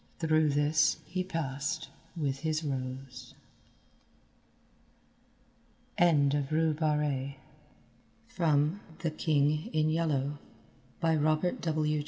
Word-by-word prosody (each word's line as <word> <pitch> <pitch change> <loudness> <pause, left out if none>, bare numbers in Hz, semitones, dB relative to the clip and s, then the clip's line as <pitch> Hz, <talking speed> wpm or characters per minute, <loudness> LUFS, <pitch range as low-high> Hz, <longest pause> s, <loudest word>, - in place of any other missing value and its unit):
Through 155 -2 +3
this 150 +1 +3
he 185 0 -2
passed 150 -7 -3 0.3
with 140 -4 -1
his 155 +1 -1
rose. 130 -3 -5 2.6
End 145 -5 +4
of 145 -2 0
Project 155 -1 +1 1.4
Gutenberg's 160 +1 -1
The 165 - 0
King 150 -1 +1
in 155 0 +2
Yellow, 145 -3 0 0.6
by 165 -1 +2
Robert 155 +3 +1
W. 155 -2 0
155 Hz, 90 wpm, -30 LUFS, 145-160 Hz, 2.6 s, End